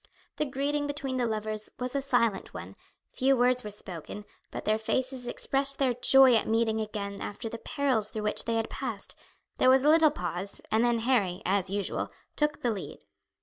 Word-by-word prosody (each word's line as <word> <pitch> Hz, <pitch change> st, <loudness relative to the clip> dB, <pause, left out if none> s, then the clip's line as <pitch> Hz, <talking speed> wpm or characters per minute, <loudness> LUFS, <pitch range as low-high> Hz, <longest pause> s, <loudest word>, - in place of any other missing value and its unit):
The 300 Hz, -, +1 dB
greeting 290 Hz, +2 st, -1 dB
between 280 Hz, -3 st, -3 dB
the 245 Hz, -2 st, +1 dB
lovers 215 Hz, -1 st, -2 dB
was 250 Hz, +1 st, -4 dB
a 280 Hz, -, +1 dB
silent 235 Hz, -7 st, 0 dB
one, -, -, -8 dB, 0.4 s
few 270 Hz, +1 st, +2 dB
words 250 Hz, +1 st, +3 dB
were 210 Hz, -, -5 dB
spoken, 205 Hz, 0 st, -6 dB, 0.2 s
but -, -, -7 dB
their 215 Hz, +1 st, +2 dB
faces 255 Hz, +2 st, -2 dB
expressed 275 Hz, +2 st, 0 dB
their 260 Hz, -3 st, +2 dB
joy 260 Hz, +1 st, +6 dB
at 225 Hz, -, +2 dB
meeting 220 Hz, 0 st, +1 dB
again 200 Hz, -2 st, -5 dB
after 205 Hz, +2 st, -5 dB
the 230 Hz, +1 st, -6 dB
perils 255 Hz, -8 st, 0 dB
through 215 Hz, -1 st, -5 dB
which 210 Hz, -, 0 dB
they 230 Hz, -, 0 dB
had 225 Hz, 0 st, 0 dB
passed; -, -, -5 dB, 0.5 s
there -, -, +5 dB
was 260 Hz, 0 st, +5 dB
a -, -, +6 dB
little 320 Hz, 0 st, +6 dB
pause, 180 Hz, -, -4 dB
and 220 Hz, +2 st, +3 dB
then 240 Hz, -1 st, +2 dB
Harry, 210 Hz, -8 st, +1 dB
as 190 Hz, 0 st, +1 dB
usual, 200 Hz, 0 st, -2 dB, 0.2 s
took 300 Hz, -1 st, 0 dB
the 240 Hz, -, +2 dB
lead. 205 Hz, -, -6 dB
235 Hz, 190 wpm, -28 LUFS, 210-265 Hz, 0.5 s, joy